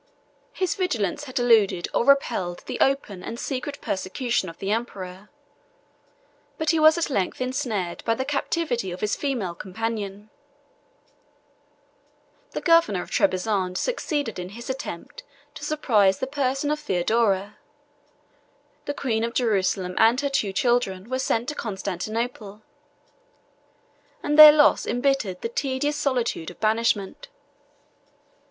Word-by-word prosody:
His 370 -3 -1
vigilance 290 - -2
had 255 - -6
eluded 220 -7 +3
or - - +2
repelled 195 -10 +1
the - - -5
open 270 -9 0
and 230 +4 -6
secret 285 +1 -4
persecution 190 +2 -2
of 165 - -12
the 195 +1 -3
emperor; 195 -4 -4 1.3
but 315 -1 +1
he 325 - +1
was 310 +1 +6
at 335 -3 -1
length 195 -7 -1
insnared 235 -8 -3
by 230 - +1
the 260 - -3
captivity 275 - -1
of 180 - -7
his 210 - 0
female 240 -11 -2
companion. 210 +2 -5 2.2
The - - -3
governor 330 - +3
of - - -14
Trebizond 185 -1 0
succeeded 290 - -2
in 180 0 -6
his 235 +3 -5
attempt 260 -10 -7 0.3
to - - -10
surprise 220 -11 +2
the - - -2
person 275 +1 -1
of 300 - -1
Theodora: 205 -3 0 1.3
the 285 - -3
queen 225 -6 -1
of 235 +1 -3
Jerusalem 190 -5 0
and 230 +3 +5
her 285 - -1
two 225 -8 0
children 225 -2 0
were 260 - 0
sent 240 -2 0
to - - -3
Constantinople, 215 0 -4 1.6
and 295 - 0
their 305 0 +13
loss 295 0 +4
imbittered 245 -8 0
the 230 - -3
tedious 270 +3 -1
solitude 255 - -1
of 180 - -14
banishment. 220 -2 0
230 Hz, 130 wpm, -24 LUFS, 195-275 Hz, 2.2 s, their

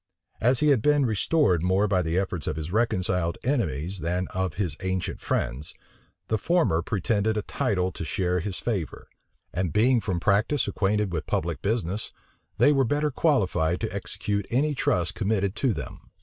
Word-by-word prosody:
As 125 +2 +3
he 150 - +4
had 135 -6 +4
been 145 +1 +3
restored 105 - +2
more 95 +4 +2
by 95 -2 +2
the 80 0 -1
efforts 95 -5 -2
of - - -1
his 80 +2 -5
reconciled 90 -6 0
enemies 95 - -1
than 90 +3 -1
of 95 -4 -2
his 95 -4 -2
ancient 95 -1 -3
friends, 60 +6 -2 0.5
the 110 - 0
former 160 - +2
pretended 110 +3 0
a 105 - -1
title 95 -2 -1
to 85 - -6
share 90 +2 0
his 90 +1 -4
favor; 100 -9 -3 0.5
and 90 -1 -1
being 120 - +3
from 95 -5 -2
practice 110 - +2
acquainted 105 -1 0
with 80 -3 -3
public 85 0 -1
business, 105 -1 -2 0.5
they 145 - +5
were 135 -2 +3
better 145 +4 0
qualified 95 - +1
to - - -3
execute 100 0 -3
any 145 +5 +1
trust 90 - 0
committed 100 -1 0
to 130 - +2
them. - - -7
100 Hz, 170 wpm, -26 LUFS, 90-115 Hz, 0.5 s, they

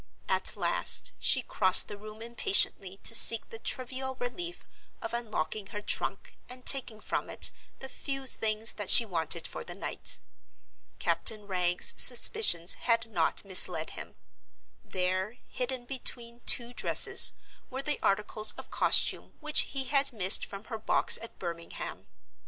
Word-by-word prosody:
At - - 0
last - - 0
she 260 - +3
crossed 185 -5 +4
the 205 - -9
room 215 +2 -13
impatiently 195 -4 0
to - - +2
seek 230 0 +5
the 225 - -9
trivial 260 +2 -4
relief 340 +8 -7 0.3
of - - -8
unlocking 215 -4 -5
her 205 - -9
trunk - - -4
and 250 0 -11
taking 245 -5 +1
from - - -6
it - - +2 0.3
the 265 - -10
few 270 0 -7
things 220 -3 -3
that 205 -2 -7
she 235 - +7
wanted 165 -4 -3
for - - -8
the 175 - -11
night. 195 - -3 0.8
Captain 215 -2 -1
Wragge's 180 -2 0
suspicions 245 - +5 0.2
had 230 -1 -1
not 170 +1 -3
misled 190 -2 +1
him. - - -9 0.7
There, 185 +4 -3
hidden 250 0 -5
between 240 -2 -4
two 240 0 +3
dresses, - - +5 0.4
were 265 +1 -7
the 300 0 -4
articles 210 +1 +2
of - - -14
costume - - +2
which 305 -1 +3
he 270 -1 -5
had 275 +1 -1
missed 195 -4 +4
from 195 +1 -11
her 225 -1 -9
box 215 - +1
at 230 - -12
Birmingham. 170 -2 -9
225 Hz, 145 wpm, -27 LUFS, 195-255 Hz, 0.8 s, she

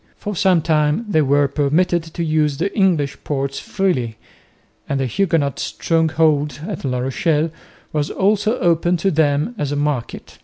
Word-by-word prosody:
For 205 0 -5
some 180 -3 +3
time 155 +6 +1
they 160 -7 +2
were 145 0 +3
permitted 155 +5 +1
to 170 - -2
use 155 -3 +1
the 195 +6 -2
English 175 -9 +1
ports 140 -1 -2
freely, 130 - -1 0.7
and 140 - 0
the 135 - 0
Huguenot 160 - 0
stronghold 160 -3 +1
at 210 - -5
La 130 -2 -1
Rochelle 155 +5 0 0.4
was 150 -1 0
also 210 +4 +1
open 175 0 +2
to 195 +3 0
them 150 +6 +1
as 145 -1 -1
a - - -1
market. 145 -5 -3
155 Hz, 155 wpm, -19 LUFS, 145-180 Hz, 0.7 s, some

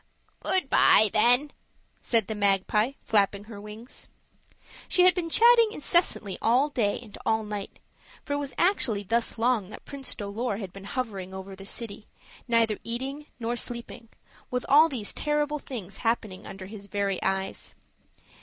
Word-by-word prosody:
"Good 370 -7 0
by, 215 -5 +6
then," 245 +6 +4 0.5
said 230 -4 +2
the 220 - -4
magpie, 210 +4 +1
flapping 200 -1 +2
her 210 -1 -10
wings. 215 +4 -9 0.8
She 360 - +4
had 365 0 +7
been 345 -3 -3
chatting 465 +3 +6
incessantly 295 - 0
all 250 +6 +3
day 225 -8 0
and 215 - -12
all 220 0 +1
night, 210 -1 -6 0.5
for 285 - -2
it - - 0
was 280 -2 -5
actually 245 - +2
thus 230 +4 -1
long 225 -4 +1
that - - -11
Prince 275 -3 -4
Dolor 205 +1 -3
had 195 -4 -7
been 195 0 -10
hovering 200 -7 -4
over 190 0 -8
the 195 +1 -11
city, 215 -2 -6 0.4
neither 230 -3 +2
eating 270 +6 -5
nor 235 +1 -2
sleeping, 235 -1 -5 0.4
with 250 0 -2
all 305 +4 +7
these 235 -8 -3
terrible 295 0 -1
things 205 -9 -7
happening 225 -5 -2
under 190 -1 -8
his 200 0 -10
very 200 -1 -1
eyes. 195 0 -3
225 Hz, 155 wpm, -27 LUFS, 200-270 Hz, 0.8 s, had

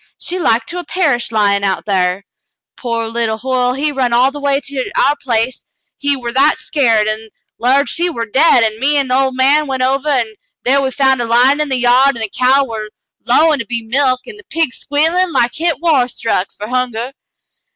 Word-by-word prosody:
She 365 - -3
like 235 -8 +1
to 355 - -4
'a' - - -6
perished 295 -12 0
lyin' 200 -2 +1
out 195 -1 -1
thar. 185 -1 0 0.5
Pore 230 -2 -3
little 225 -1 -2
Hoyle, 250 +1 0
he 295 +3 -1
run 255 -4 -1
all 250 +3 +3
the 290 - -8
way 280 -1 +1
to 270 -1 -5
our 285 - +3
place 235 0 -1 0.4
he 285 0 +1
war 240 -3 -5
that 270 +5 +3
skeered, 235 -9 +1
an' 220 +1 -4 0.3
'lowed 265 +4 +2
she 350 +1 0
war 235 -8 -4
dade, 255 +2 +3
an' 220 -1 -1
me 290 +3 +2
an' 275 -2 0
the - - 0
ol' 265 0 +2
man 275 +4 +2
went 260 -1 -2
ovah, 270 +3 0
an' 235 -5 0 0.3
thar 275 +3 +3
we 265 - -1
found 265 -1 +1
her 235 - -3
lyin' 255 +5 +3
in 300 - -2
the 265 - 0
yard, 250 +2 +3
an' - - -6
the 215 - -5
cow 260 +2 +3
war 220 -3 -6 0.4
lowin' 300 +4 +3
to 230 - -4
be 235 0 -4
milked, 255 +2 0
an' 445 - -10
the 450 - -15
pig 320 -5 -1
squeelin' 325 +5 0
like 240 0 +1
hit 330 -1 -1
war 300 -7 +2
stuck, 225 -5 -2
fer 210 - -8
hunger. 250 0 -2
255 Hz, 215 wpm, -15 LUFS, 230-285 Hz, 0.5 s, all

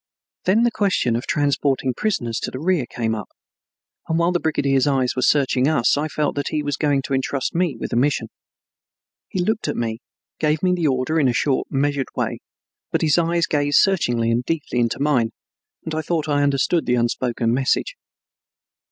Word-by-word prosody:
Then 210 +5 +3
the 240 - +3
question 190 - +1
of 120 - -3
transporting 140 -3 +1
prisoners 120 - -1
to - - -3
the - - -7
rear 160 -3 0
came 115 -2 -2
up, 105 -2 -5 0.8
and 160 - +1
while 170 +1 +2
the 175 - +1
brigadier's 140 -4 +1
eyes 130 -3 +1
were 130 - -1
searching 135 -1 +3
us 150 -7 +3
I 150 +2 -1
felt 150 -1 -1
that 145 -1 -3
he 150 -1 -1
was 145 -1 -1
going 145 -2 +1
to 135 - -4
entrust 135 0 -1
me 170 -5 0
with - - -5
that - - 0
mission. 130 -3 +1 1.0
He 185 - -2
looked 220 +3 -1
at - - -2
me, 115 -1 -2 0.4
gave 155 +1 0
me 180 -1 +3
the 170 -3 +1
order 135 +4 0
in 140 - +3
a 125 - +2
short, 130 +2 0
measured 140 0 0
way, - - -2 0.5
but - - 0
his 155 +1 +3
eyes 170 0 +1
gazed 145 -1 +1
searchingly 120 - +2
and 120 +2 +1
deeply 150 -4 -2
into 115 -1 0
mine, 135 -6 +1 0.5
and 160 - -4
I 160 - -1
thought 160 -1 -2
I 145 -1 +1
understood 145 +4 +1
the 125 - +3
unspoken 120 -1 0
message. 135 - 0
145 Hz, 195 wpm, -21 LUFS, 125-160 Hz, 1.0 s, Then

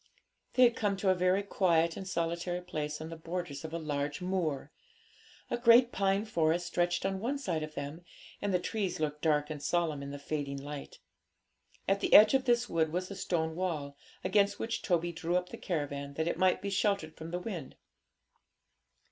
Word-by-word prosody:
They 255 - +6
had 240 -1 +5
come 200 -2 0
to 190 -1 +2
a - - +5
very 185 +2 +2
quiet 170 -4 +2
and 190 - -6
solitary 170 0 -2
place 150 -4 -4
on 160 - -6
the - - -5
borders 165 -3 -5
of 160 - -6
a 165 - -2
large 145 -2 -2
moor. 170 -6 -2 0.8
A - - 0
great 240 +1 +6
pine 195 +1 +1
forest 170 -4 +1
stretched 175 0 0
on 195 0 -1
one 255 +7 -1
side 180 - -2
of 155 0 -6
them, 145 +5 -5 0.4
and 205 - 0
the 180 - +3
trees 185 -1 -2
looked 150 -1 -2
dark 150 -1 +2
and 150 -2 -5
solemn 160 -3 0
in 140 - -6
the 145 - -6
fading 140 -1 -3
light. 145 0 -7 0.9
At 195 +1 +2
the - - 0
edge 215 +3 +9
of 265 -1 +3
this 240 -1 +3
wood 160 -2 +1
was 180 +3 -3
a - - -5
stone 160 -4 -1
wall, 155 -6 -2 0.3
against 200 +1 +2
which 225 0 -3
Toby 175 -1 +1
drew 170 +1 -1
up 180 0 -3
the - - -8
caravan, 140 -4 -3
that 160 +2 -1
it - - 0
might 185 +1 +3
be 200 - -2
sheltered 195 -5 0
from 160 +1 -8
the 175 - -2
wind. 180 - -6
175 Hz, 200 wpm, -31 LUFS, 155-195 Hz, 0.9 s, edge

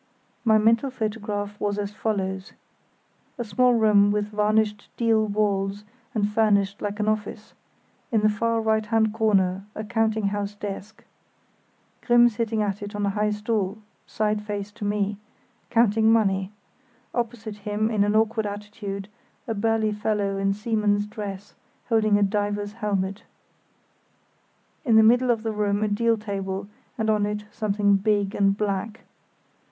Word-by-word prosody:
My 220 -2 +5
mental 230 +5 +3
photograph 210 -3 -4
was 205 0 -1
as 205 -1 -3
follows: 195 -3 -3 0.8
a 240 - -2
small 250 +2 +3
room 210 -3 +5
with 210 0 0
varnished 210 0 +1
deal 225 -2 +2
walls 200 -1 0 0.3
and 205 -2 +2
furnished 205 -2 +1
like 205 0 -3
an 210 - 0
office; 215 0 -3 0.6
in 220 -3 +2
the 215 - +4
far 230 +2 0
right 220 0 +1
hand 220 0 +1
corner 195 -4 +1
a 215 - -4
counting 220 -2 0
house 205 0 -3
desk, 205 +1 -7 1.0
Grimm 240 0 +6
sitting 225 -1 -1
at 200 0 -2
it 205 +1 -6
on 205 0 -1
a 200 - +1
high 210 +1 0
stool, 210 -1 -1 0.3
side 215 -1 -1
face 205 -1 -5
to 215 0 -7
me, 205 0 -1 0.5
counting 225 -1 +4
money; 195 -4 +2 0.6
opposite 230 -3 -3
him 210 +2 -1
in 210 -2 +2
an 205 +1 +1
awkward 220 0 +2
attitude 205 -1 -6 0.4
a 225 - -1
burly 220 0 +1
fellow 210 -1 -1
in 195 0 +1
seaman's 210 -1 0
dress 205 -1 -7 0.4
holding 215 -3 +3
a 205 - +3
diver's 205 0 -1
helmet. 200 -2 -2 1.6
In 235 -7 +3
the 220 - +8
middle 245 +3 +4
of 230 -2 +1
the 225 - -1
room 205 -1 0
a - - +2
deal 230 +2 +2
table, 200 -2 -4 0.3
and 220 -2 -1
on 210 -1 +2
it 210 0 -4
something 205 -1 +2
big 205 -1 +1
and 195 0 +2
black. 210 +1 -2
210 Hz, 150 wpm, -25 LUFS, 205-220 Hz, 1.6 s, the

